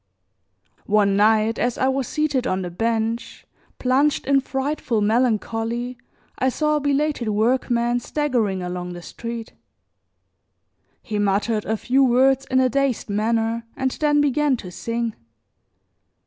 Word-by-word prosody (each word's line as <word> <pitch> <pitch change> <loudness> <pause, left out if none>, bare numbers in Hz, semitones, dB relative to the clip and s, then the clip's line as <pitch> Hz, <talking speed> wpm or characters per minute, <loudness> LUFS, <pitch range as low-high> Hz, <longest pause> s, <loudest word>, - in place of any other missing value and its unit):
One 205 -2 +3
night, 215 +2 +3
as 245 0 0
I 260 - +1
was 265 -1 0
seated 290 -5 0
on 185 0 -1
the 175 - -5
bench, 225 +4 -2 0.3
plunged 270 +4 +1
in 275 0 +3
frightful 270 -3 -2
melancholy, 230 +2 0 0.4
I 260 - +2
saw 300 +3 +1
a - - 0
belated 285 -4 0
workman 240 +2 +1
staggering 240 -9 -1
along 180 0 -5
the 175 0 -9
street. 230 +2 -7 1.5
He 215 -4 -3
muttered 205 +2 0
a 220 +1 -1
few 265 +5 +2
words 265 +2 +3
in 260 - +3
a 260 - +4
dazed 265 -4 -1
manner 225 +2 0
and 265 0 0
then 295 0 +2
began 290 -1 +2
to 185 -5 -9
sing. 230 +3 -3
235 Hz, 135 wpm, -22 LUFS, 220-265 Hz, 1.5 s, a